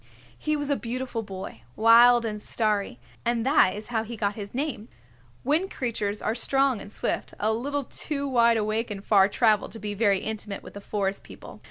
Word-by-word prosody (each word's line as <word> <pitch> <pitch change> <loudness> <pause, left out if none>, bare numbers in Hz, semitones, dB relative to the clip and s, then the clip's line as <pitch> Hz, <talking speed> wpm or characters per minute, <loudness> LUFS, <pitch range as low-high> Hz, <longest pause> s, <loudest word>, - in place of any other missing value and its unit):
He 305 0 -1
was 290 -1 -2
a - - +3
beautiful 245 -1 -4
boy, 190 - -8
wild 235 +1 +6
and 210 -1 -4
starry, 215 +2 0 0.3
and 235 -1 0
that 265 -9 +4
is 215 +3 -8
how 225 -2 0
he 230 +1 -7
got 205 -1 0
his 205 -1 -7
name. 265 -6 -3 0.6
Wind 315 +8 +1
Creatures 215 - -3
are 220 - 0
strong 270 0 +1
and 205 - -10
swift, - - -3
a 215 +1 +1
little 285 +5 -2
too 280 +2 -3
wide 235 -3 +4
awake 215 +2 -1
and 200 -1 -7
far 195 -3 +5
traveled 215 -1 +2
to 225 - -8
be 210 0 -4
very 200 -2 +2
intimate 210 -2 -5
with - - -11
the 200 - -9
Forest 200 -1 -2
People. - - -12
225 Hz, 195 wpm, -26 LUFS, 210-245 Hz, 0.6 s, wild